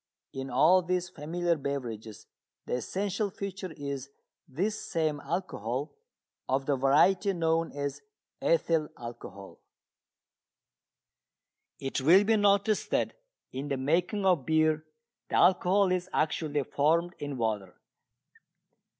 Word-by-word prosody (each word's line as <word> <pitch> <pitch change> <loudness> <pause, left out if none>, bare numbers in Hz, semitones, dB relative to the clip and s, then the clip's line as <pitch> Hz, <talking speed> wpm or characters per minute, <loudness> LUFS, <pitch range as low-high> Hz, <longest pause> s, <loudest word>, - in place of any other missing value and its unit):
In 135 0 -5
all 160 +9 +5
these 180 0 -1
familiar 170 +3 -1
beverages 120 -7 -5 0.4
the - - -4
essential 200 - -1
feature 195 -1 -6
is 140 -1 -5 0.4
this 195 +11 -2
same 155 -4 -1
alcohol, 135 - -3 0.6
of 135 +1 +1
the 145 - +2
variety 165 +9 +3
known 165 -1 0
as 140 -1 -4 0.4
ethyl 165 - +2
alcohol. 115 -5 -9 2.2
It 135 0 -2
will 175 +9 +6
be 220 +2 +3
noticed 205 0 +2
that - - 0 0.4
in 135 +3 -4
the 140 -2 -1
making 175 +9 0
of 180 -7 +3
beer 155 +1 +2 0.4
the - - -2
alcohol 185 +1 +4
is 185 0 -1
actually 150 -2 0
formed 165 +6 +1
in 145 -2 -4
water. 105 -5 -2
155 Hz, 115 wpm, -29 LUFS, 135-185 Hz, 2.2 s, will